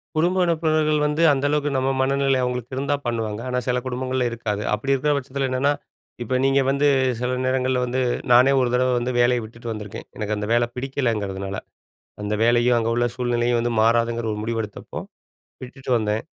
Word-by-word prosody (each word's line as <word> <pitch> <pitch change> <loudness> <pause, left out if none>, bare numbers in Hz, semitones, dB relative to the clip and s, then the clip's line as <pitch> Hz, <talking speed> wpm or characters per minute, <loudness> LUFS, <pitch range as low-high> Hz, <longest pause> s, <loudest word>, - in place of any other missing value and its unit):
குடும்ப 175 +4 +2
உறுப்பினர்கள் 155 -2 +1
வந்து 150 +2 0
அந்த 140 0 -1
அளவுக்கு 150 0 +1
நம்ம 130 0 +1
மனநிலை 135 0 +2
அவங்களுக்கு 125 0 -3
இருந்தா 140 +2 0
பண்ணுவாங்க. 110 -2 -2
ஆனா 125 - 0
சில 125 0 +1
குடும்பங்கள்ல 130 0 -1
இருக்காது. 110 -3 -3
அப்படி 120 +6 -1
இருக்கற 135 +2 +1
பட்சத்தில 135 0 -2
என்னன்னா, 130 +3 +1 0.5
இப்ப 125 +2 0
நீங்க 135 0 +3
வந்து 140 +1 +2 0.3
சில 125 +1 -1
நேரங்கள்ல 130 0 +1
வந்து 125 +1 -1 0.3
நானே 125 +3 +7
ஒரு 125 - +1
தடவ 130 +1 +2
வந்து 120 +1 -1
வேலைய 120 0 +3
விட்டுட்டு 115 +1 -8
வந்துருக்கேன், 105 0 -7
எனக்கு 105 -1 -2
அந்த 105 - -3
வேல 120 0 +3
பிடிக்கலைங்கிறதுனால. 110 -8 -2 0.7
அந்த 105 +1 -1
வேலையும், 120 +1 +4
அங்க 115 0 -1
உள்ள 120 +1 +1
சூழ்நிலையும் 120 -1 +1
வந்து 120 0 -1
மாறாதுங்கிற 115 +1 +2
ஒரு 105 - -4
முடிவு 115 +1 -2
எடுத்தப்போ, 105 -1 -8 0.7
விட்டுட்டு 130 +1 -7
வந்தேன். 105 0 -1
125 Hz, 170 wpm, -23 LUFS, 115-135 Hz, 0.7 s, நானே